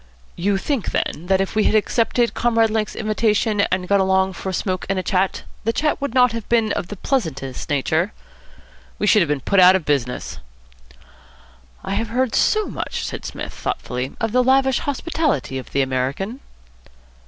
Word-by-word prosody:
"You 195 Hz, +3 st, +1 dB
think, 260 Hz, +2 st, -2 dB
then, 170 Hz, +4 st, -2 dB
that 190 Hz, 0 st, +3 dB
if 195 Hz, -, -2 dB
we 215 Hz, -1 st, +2 dB
had -, -, +3 dB
accepted 230 Hz, +2 st, +1 dB
Comrade 230 Hz, -2 st, +2 dB
Lake's 215 Hz, -1 st, -1 dB
invitation, 215 Hz, -1 st, +1 dB
and 185 Hz, 0 st, -1 dB
gone 200 Hz, +1 st, +3 dB
along 190 Hz, 0 st, +2 dB
for 190 Hz, -, -5 dB
a -, -, -2 dB
smoke 185 Hz, 0 st, -2 dB
and 195 Hz, -, 0 dB
a 185 Hz, -, -1 dB
chat, 190 Hz, 0 st, 0 dB, 0.2 s
the 225 Hz, -, +1 dB
chat 300 Hz, +4 st, 0 dB
would 280 Hz, -3 st, -3 dB
not 250 Hz, -1 st, +5 dB
have 230 Hz, -2 st, -6 dB
been 225 Hz, -3 st, +2 dB
of 175 Hz, -, -2 dB
the 205 Hz, -, -6 dB
pleasantest 160 Hz, -, -3 dB
nature?" 160 Hz, +6 st, +1 dB, 0.9 s
"We -, -, -1 dB
should 210 Hz, 0 st, +5 dB
have 170 Hz, -, +1 dB
been 145 Hz, -2 st, 0 dB
put 200 Hz, +8 st, +2 dB
out 185 Hz, +1 st, +8 dB
of 185 Hz, -5 st, -1 dB
business." 125 Hz, -, -2 dB, 1.4 s
"I -, -, -3 dB
have 225 Hz, +3 st, -1 dB
heard 250 Hz, +1 st, 0 dB
so 430 Hz, -1 st, +3 dB
much," -, -, -4 dB
said -, -, -6 dB
Psmith, -, -, -6 dB
thoughtfully, 125 Hz, +1 st, -4 dB
"of 225 Hz, -, -1 dB
the 250 Hz, +2 st, +3 dB
lavish 265 Hz, 0 st, +3 dB
hospitality 290 Hz, -, -1 dB
of 130 Hz, -, -10 dB
the 140 Hz, -, +1 dB
American." 135 Hz, -, -2 dB
205 Hz, 185 wpm, -21 LUFS, 180-230 Hz, 1.4 s, out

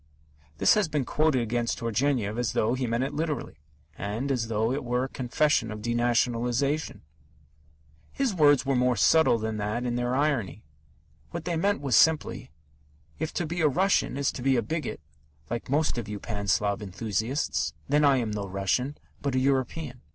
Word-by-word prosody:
This -, -, +5 dB
has 210 Hz, -4 st, +2 dB
been 150 Hz, -4 st, -1 dB
quoted 150 Hz, -4 st, +2 dB
against 120 Hz, +1 st, -1 dB
Turgenev 115 Hz, -1 st, 0 dB
as 120 Hz, -4 st, -1 dB
though 110 Hz, -, +1 dB
he 130 Hz, -1 st, -1 dB
meant 115 Hz, +2 st, 0 dB
it 135 Hz, +2 st, -3 dB
literally, 150 Hz, -, -3 dB, 0.4 s
and 110 Hz, -, -3 dB
as 120 Hz, -4 st, -1 dB
though 110 Hz, +1 st, 0 dB
it 140 Hz, +2 st, -2 dB
were 125 Hz, +1 st, 0 dB
a 135 Hz, -, -3 dB
confession 130 Hz, -1 st, +1 dB
of 105 Hz, -1 st, -7 dB
denationalization. 120 Hz, +4 st, 0 dB, 1.1 s
His 270 Hz, -6 st, -1 dB
words 145 Hz, -5 st, +4 dB
were 135 Hz, 0 st, +1 dB
more 125 Hz, 0 st, +2 dB
subtle 120 Hz, +6 st, +4 dB
than 110 Hz, -1 st, -3 dB
that 105 Hz, +4 st, -2 dB
in 120 Hz, 0 st, -1 dB
their 120 Hz, +1 st, 0 dB
irony. 130 Hz, -, 0 dB, 0.7 s
What 170 Hz, -1 st, -6 dB
they 175 Hz, -1 st, -1 dB
meant 200 Hz, +3 st, +1 dB
was 135 Hz, -5 st, +1 dB
simply: 160 Hz, +3 st, +3 dB, 0.7 s
"If 160 Hz, 0 st, -2 dB
to 175 Hz, -, -1 dB
be 170 Hz, +2 st, -3 dB
a 155 Hz, -, +5 dB
Russian 185 Hz, -1 st, +1 dB
is 140 Hz, -1 st, +1 dB
to -, -, -7 dB
be 135 Hz, +1 st, +3 dB
a 120 Hz, -, +1 dB
bigot, 155 Hz, -, -4 dB, 0.5 s
like 120 Hz, +1 st, -4 dB
most 145 Hz, -2 st, +1 dB
of 110 Hz, -, -6 dB
you 105 Hz, -1 st, -5 dB
Pan 100 Hz, -2 st, -5 dB
Slav 100 Hz, +1 st, +1 dB
enthusiasts, 110 Hz, -, -2 dB, 0.2 s
then 150 Hz, +1 st, +3 dB
I 140 Hz, -2 st, +5 dB
am 115 Hz, -4 st, -1 dB
no 105 Hz, -1 st, -3 dB
Russian, 100 Hz, +9 st, -1 dB, 0.2 s
but 140 Hz, -2 st, -1 dB
a -, -, +3 dB
European." 130 Hz, 0 st, -1 dB
125 Hz, 180 wpm, -27 LUFS, 115-145 Hz, 1.1 s, This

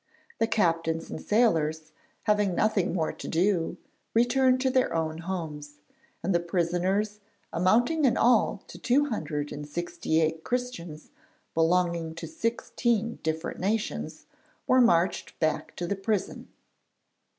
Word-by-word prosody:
The 225 Hz, -, +3 dB
captains 165 Hz, -6 st, 0 dB
and -, -, -5 dB
sailors, 160 Hz, -8 st, +1 dB, 0.3 s
having 210 Hz, -4 st, +2 dB
nothing 205 Hz, -3 st, +2 dB
more 165 Hz, -3 st, -1 dB
to -, -, -8 dB
do, 175 Hz, 0 st, +1 dB, 0.4 s
returned 255 Hz, +2 st, +4 dB
to 260 Hz, -1 st, +2 dB
their 255 Hz, -8 st, +2 dB
own 160 Hz, 0 st, -1 dB
homes; 160 Hz, -5 st, -5 dB, 0.5 s
and 195 Hz, -, +1 dB
the 170 Hz, -, +3 dB
prisoners, 180 Hz, +4 st, 0 dB, 0.3 s
amounting 240 Hz, -, +3 dB
in 250 Hz, -, +3 dB
all 230 Hz, -4 st, +3 dB
to -, -, -11 dB
two 285 Hz, +4 st, +2 dB
hundred 150 Hz, -, -3 dB
and 145 Hz, 0 st, -6 dB
sixty 165 Hz, 0 st, -1 dB
eight 160 Hz, 0 st, 0 dB
Christians 175 Hz, -12 st, -4 dB, 0.4 s
belonging 165 Hz, -1 st, +1 dB
to -, -, -6 dB
sixteen 235 Hz, -5 st, -1 dB
different 160 Hz, +1 st, -3 dB
nations, 210 Hz, +4 st, -2 dB, 0.4 s
were 255 Hz, 0 st, +5 dB
marched 180 Hz, -7 st, +2 dB
back 155 Hz, -1 st, -1 dB
to 175 Hz, -, -3 dB
the 200 Hz, -, -1 dB
prison. 200 Hz, 0 st, -2 dB
180 Hz, 130 wpm, -27 LUFS, 165-225 Hz, 0.5 s, were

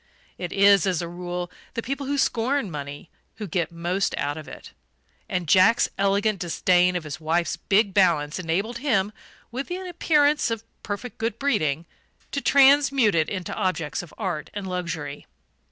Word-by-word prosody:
It 175 Hz, -, -4 dB
is, 200 Hz, -2 st, +5 dB
as 180 Hz, -3 st, 0 dB
a -, -, -4 dB
rule, 175 Hz, 0 st, -5 dB, 0.2 s
the 230 Hz, -, -2 dB
people 275 Hz, +2 st, -4 dB
who 285 Hz, +1 st, 0 dB
scorn 250 Hz, -3 st, 0 dB
money 145 Hz, +1 st, -7 dB, 0.2 s
who 215 Hz, -, -6 dB
get 175 Hz, -1 st, -2 dB
most 175 Hz, +3 st, -1 dB
out 145 Hz, 0 st, -1 dB
of 155 Hz, -1 st, -9 dB
it; -, -, -11 dB, 0.6 s
and 180 Hz, -2 st, -2 dB
Jack's 190 Hz, +8 st, +5 dB
elegant 200 Hz, +1 st, +1 dB
disdain 180 Hz, +1 st, +2 dB
of 175 Hz, -, -2 dB
his 150 Hz, 0 st, -7 dB
wife's 170 Hz, +2 st, 0 dB
big 200 Hz, +2 st, +2 dB
balance 165 Hz, -6 st, +2 dB
enabled 195 Hz, +8 st, -2 dB
him, 215 Hz, -7 st, +1 dB, 0.4 s
with 260 Hz, +3 st, -4 dB
an 370 Hz, +1 st, -4 dB
appearance 300 Hz, -5 st, +2 dB
of 225 Hz, -1 st, -3 dB, 0.2 s
perfect 205 Hz, +4 st, -6 dB
good 225 Hz, -1 st, -2 dB
breeding, 165 Hz, -, 0 dB, 0.5 s
to 280 Hz, -, -2 dB
transmute 275 Hz, -4 st, +5 dB
it 160 Hz, -2 st, +1 dB
into 185 Hz, -3 st, -4 dB
objects 175 Hz, -5 st, -1 dB
of 175 Hz, -, -12 dB
art 180 Hz, -8 st, -3 dB
and 205 Hz, -2 st, -4 dB
luxury. 170 Hz, -6 st, -4 dB
190 Hz, 165 wpm, -24 LUFS, 170-230 Hz, 0.6 s, is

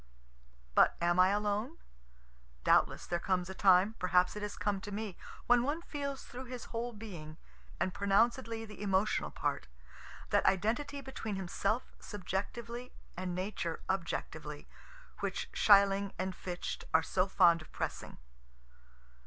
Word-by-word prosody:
But -, -, +5 dB
am 175 Hz, +1 st, +2 dB
I 185 Hz, -, +8 dB
alone? 210 Hz, +8 st, 0 dB, 0.9 s
Doubtless -, -, +3 dB
there 175 Hz, -, -1 dB
comes 185 Hz, 0 st, 0 dB
a -, -, -5 dB
time 190 Hz, +2 st, +5 dB
perhaps 180 Hz, +1 st, +3 dB
it 210 Hz, -, -5 dB
has 210 Hz, 0 st, -4 dB
come 200 Hz, -2 st, -1 dB
to 205 Hz, -, -7 dB
me 205 Hz, -2 st, -4 dB, 0.3 s
when 245 Hz, 0 st, +5 dB
one 295 Hz, +7 st, -1 dB
feels 280 Hz, -4 st, -4 dB
through 255 Hz, +1 st, -8 dB
his 250 Hz, -1 st, -7 dB
whole 235 Hz, +1 st, -2 dB
being, 175 Hz, -9 st, -9 dB, 0.4 s
and 185 Hz, -, 0 dB
pronouncedly 225 Hz, +3 st, +1 dB
the 210 Hz, -2 st, -11 dB
emotional 200 Hz, +1 st, +1 dB
part, -, -, -2 dB, 0.6 s
that -, -, +4 dB
identity 245 Hz, +9 st, +1 dB
between 240 Hz, -6 st, -5 dB
himself 195 Hz, +5 st, -1 dB
subjectively 230 Hz, +5 st, -5 dB, 0.2 s
and 180 Hz, 0 st, -3 dB
Nature 185 Hz, -3 st, -3 dB
objectively 190 Hz, -3 st, -4 dB, 0.5 s
which -, -, -3 dB
Schelling 200 Hz, -1 st, +5 dB
and 185 Hz, 0 st, -2 dB
Fichte 180 Hz, -1 st, -5 dB
are 160 Hz, -, +5 dB
so 185 Hz, +3 st, +1 dB
fond 170 Hz, -4 st, +5 dB
of 155 Hz, -, -14 dB
pressing. -, -, -4 dB
200 Hz, 135 wpm, -33 LUFS, 185-230 Hz, 0.9 s, I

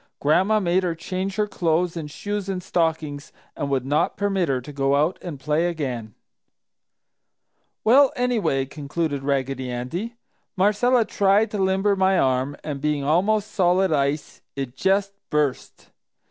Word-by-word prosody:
Gran'ma 190 Hz, +9 st, +3 dB
made 180 Hz, -1 st, +2 dB
her 175 Hz, -3 st, -1 dB
change 185 Hz, +3 st, -4 dB
her 210 Hz, -, +1 dB
clothes 175 Hz, -3 st, 0 dB
and 155 Hz, -3 st, -5 dB
shoes 205 Hz, +5 st, -4 dB
and 185 Hz, -2 st, -3 dB
stockings 160 Hz, -5 st, -1 dB, 0.2 s
and 140 Hz, -, -3 dB
would 135 Hz, -2 st, 0 dB
not 145 Hz, +3 st, 0 dB
permit 195 Hz, -5 st, 0 dB
her 130 Hz, -2 st, +1 dB
to 145 Hz, +4 st, -10 dB
go 135 Hz, 0 st, +1 dB
out 155 Hz, +6 st, +1 dB
and 165 Hz, -6 st, -7 dB
play 150 Hz, +5 st, +1 dB
again. 125 Hz, -10 st, -4 dB, 1.7 s
"Well, 265 Hz, +5 st, +6 dB
anyway," 210 Hz, -, 0 dB
concluded 145 Hz, +1 st, -3 dB
Raggedy 135 Hz, -2 st, -1 dB
Andy, 165 Hz, -, -4 dB, 0.4 s
"Marcella 220 Hz, +5 st, +3 dB
tried 205 Hz, +2 st, +2 dB
to 210 Hz, -, -3 dB
limber 190 Hz, +1 st, +2 dB
my 190 Hz, 0 st, +3 dB
arm 130 Hz, +1 st, +1 dB
and, 145 Hz, -3 st, -5 dB
being 150 Hz, -1 st, 0 dB
almost 200 Hz, +8 st, +1 dB
solid 185 Hz, -1 st, +2 dB
ice, 140 Hz, +1 st, -1 dB
it 135 Hz, -3 st, -5 dB
just 195 Hz, +5 st, +1 dB, 0.2 s
burst. 150 Hz, -3 st, -2 dB
165 Hz, 145 wpm, -23 LUFS, 140-195 Hz, 1.7 s, Well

